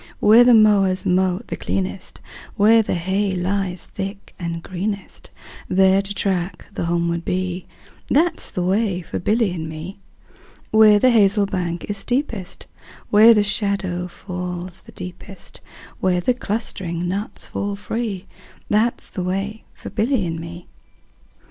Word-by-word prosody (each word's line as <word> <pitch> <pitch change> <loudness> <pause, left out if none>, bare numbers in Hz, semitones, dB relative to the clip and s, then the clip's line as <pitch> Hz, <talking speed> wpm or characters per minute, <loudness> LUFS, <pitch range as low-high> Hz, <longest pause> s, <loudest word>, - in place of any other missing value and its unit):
Where 220 +3 +7
the 245 -1 +6
mowers 200 -4 +4
mow 185 +1 +2
the - - -5
cleanest, 190 -1 -4 0.3
Where 225 +3 +6
the 210 - -2
hay 190 +3 0
lies 185 0 -2
thick 195 +1 -7
and 170 -1 -4
greenest, 195 +2 -5 0.4
10 185 - -3
There 190 0 +5
to 200 +1 -4
track 185 -2 -2
the - - -3
homeward 170 0 0
bee, 185 0 -2 0.4
That 325 +6 +2
's - - -3
the 180 - -3
way 190 -1 0
for - - -5
Billy 215 +1 +1
and 160 -3 -5
me. 165 +5 -8 0.7
Where 220 -1 +7
the 255 +5 +4
hazel 205 -2 +4
bank 175 -3 -3
is 205 - -3
steepest, 230 -4 -3 0.5
Where 220 +2 +8
the 210 - +4
shadow 200 -4 -1
falls 180 0 -6
the - - -15
deepest, 180 +2 -10 0.4
Where 185 -1 +2
the 245 +8 +2
clustering 190 -7 -3
nuts 200 +3 -4
fall 200 0 -3
free, 210 -1 -3 0.4
15 - - -34
That 225 +3 +2
's - - -3
the 185 - -5
way 195 +4 -3
for - - -9
Billy 225 -1 +1
and 165 -1 -3
me. 170 +1 -8
195 Hz, 155 wpm, -21 LUFS, 180-210 Hz, 0.7 s, Where